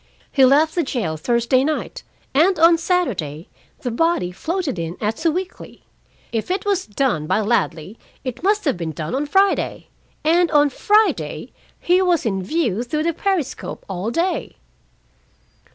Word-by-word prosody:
He 270 Hz, -, +4 dB
left 300 Hz, +4 st, +4 dB
the 350 Hz, -, +1 dB
jail 230 Hz, -, -2 dB
Thursday 235 Hz, -, +1 dB
night, 305 Hz, +2 st, -3 dB, 0.3 s
and 340 Hz, +7 st, +4 dB
on 330 Hz, +1 st, +5 dB
Saturday 200 Hz, -, -1 dB, 0.3 s
the 245 Hz, -, -3 dB
body 285 Hz, -, +1 dB
floated 320 Hz, -, -3 dB
in 165 Hz, +1 st, -4 dB
at 215 Hz, +1 st, -2 dB
Sewickley. 350 Hz, +3 st, -3 dB, 0.5 s
If 225 Hz, +5 st, -3 dB
it 375 Hz, +2 st, -1 dB
was 395 Hz, -2 st, 0 dB
done 205 Hz, -, -1 dB
by -, -, +2 dB
Ladley, 200 Hz, -3 st, -1 dB, 0.2 s
it 255 Hz, -3 st, -5 dB
must 410 Hz, +2 st, +1 dB
have 275 Hz, -, +1 dB
been 165 Hz, -2 st, -4 dB
done 155 Hz, +1 st, -5 dB
on 285 Hz, +3 st, -1 dB
Friday, 390 Hz, +5 st, +1 dB, 0.3 s
and 335 Hz, +2 st, +3 dB
on 295 Hz, -2 st, +4 dB
Friday 425 Hz, +9 st, +1 dB, 0.3 s
he 360 Hz, +2 st, +3 dB
was 350 Hz, -6 st, +2 dB
in 195 Hz, -4 st, 0 dB
view 235 Hz, -, -1 dB
through 300 Hz, +6 st, -2 dB
the 335 Hz, +1 st, 0 dB
periscope 360 Hz, -5 st, -3 dB
all 190 Hz, +2 st, -3 dB
day!" 340 Hz, +9 st, -1 dB
285 Hz, 150 wpm, -21 LUFS, 215-345 Hz, 0.5 s, on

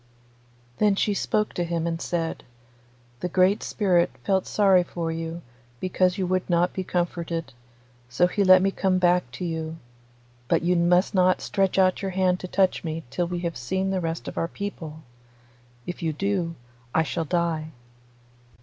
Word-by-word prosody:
Then 210 Hz, -2 st, +4 dB
she 205 Hz, +1 st, +1 dB
spoke 210 Hz, +1 st, 0 dB
to 175 Hz, -, -1 dB
him 170 Hz, -1 st, -2 dB
and 165 Hz, 0 st, -2 dB
said, 165 Hz, -2 st, -2 dB, 0.8 s
'The 180 Hz, -, -3 dB
Great 185 Hz, +3 st, +3 dB
Spirit 180 Hz, -5 st, +2 dB
felt 190 Hz, -2 st, +1 dB
sorry 195 Hz, -3 st, +4 dB
for 170 Hz, -1 st, -4 dB
you, 165 Hz, +1 st, -5 dB, 0.4 s
because 185 Hz, 0 st, +1 dB
you 190 Hz, -, 0 dB
would 185 Hz, +1 st, -1 dB
not 175 Hz, +1 st, +2 dB
be 190 Hz, -, -3 dB
comforted, 170 Hz, -3 st, -2 dB, 0.6 s
so 125 Hz, +8 st, +3 dB
he 200 Hz, +3 st, +1 dB
let 185 Hz, -1 st, +7 dB
me 195 Hz, -, +2 dB
come 190 Hz, -1 st, +1 dB
back 180 Hz, -6 st, +2 dB
to 180 Hz, -, -5 dB
you, 160 Hz, -1 st, -4 dB, 0.7 s
but -, -, +2 dB
you 180 Hz, +1 st, +2 dB
must 175 Hz, +3 st, +3 dB
not 185 Hz, -1 st, +3 dB
stretch 195 Hz, -1 st, 0 dB
out 185 Hz, -1 st, +3 dB
your 195 Hz, -, -2 dB
hand 185 Hz, -1 st, +2 dB
to 185 Hz, -, -6 dB
touch 190 Hz, 0 st, +1 dB
me 160 Hz, 0 st, -4 dB
till 175 Hz, -1 st, -1 dB
we 175 Hz, 0 st, -3 dB
have 170 Hz, -2 st, -3 dB
seen 190 Hz, +11 st, -2 dB
the 190 Hz, -1 st, 0 dB
rest 165 Hz, 0 st, -3 dB
of -, -, -4 dB
our 165 Hz, -, 0 dB
people. 160 Hz, -5 st, -7 dB, 0.8 s
If 175 Hz, -, -6 dB
you 160 Hz, -2 st, -1 dB
do, 180 Hz, -1 st, -1 dB, 0.4 s
I 160 Hz, -, +4 dB
shall 165 Hz, +1 st, -2 dB
die. 165 Hz, -1 st, 0 dB
180 Hz, 175 wpm, -25 LUFS, 165-190 Hz, 0.8 s, let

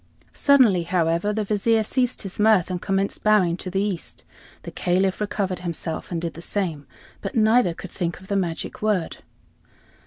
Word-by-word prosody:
Suddenly, 255 Hz, -11 st, +4 dB
however, 170 Hz, +2 st, +1 dB
the 215 Hz, 0 st, -1 dB
Vizier 215 Hz, +2 st, +2 dB
ceased 250 Hz, +2 st, -1 dB
his 195 Hz, 0 st, -7 dB
mirth, 210 Hz, -4 st, +4 dB
and 180 Hz, -1 st, -3 dB
commenced 195 Hz, 0 st, -1 dB
bowing 205 Hz, -5 st, +4 dB
to 185 Hz, -, -6 dB
the 195 Hz, +2 st, 0 dB
east. 195 Hz, -5 st, -4 dB, 0.4 s
The -, -, -7 dB
Caliph 185 Hz, +2 st, 0 dB
recovered 200 Hz, -3 st, -2 dB
himself 170 Hz, -2 st, -5 dB
and 170 Hz, -, -1 dB
did 170 Hz, 0 st, -4 dB
the 165 Hz, -, -10 dB
same, 170 Hz, -7 st, -3 dB, 0.3 s
but -, -, -5 dB
neither 220 Hz, -5 st, +4 dB
could 190 Hz, -, -9 dB
think 175 Hz, -2 st, -3 dB
of 190 Hz, -, -15 dB
the 200 Hz, -, -1 dB
magic 175 Hz, -4 st, -3 dB
word. 210 Hz, -6 st, 0 dB
190 Hz, 175 wpm, -23 LUFS, 175-210 Hz, 0.4 s, Suddenly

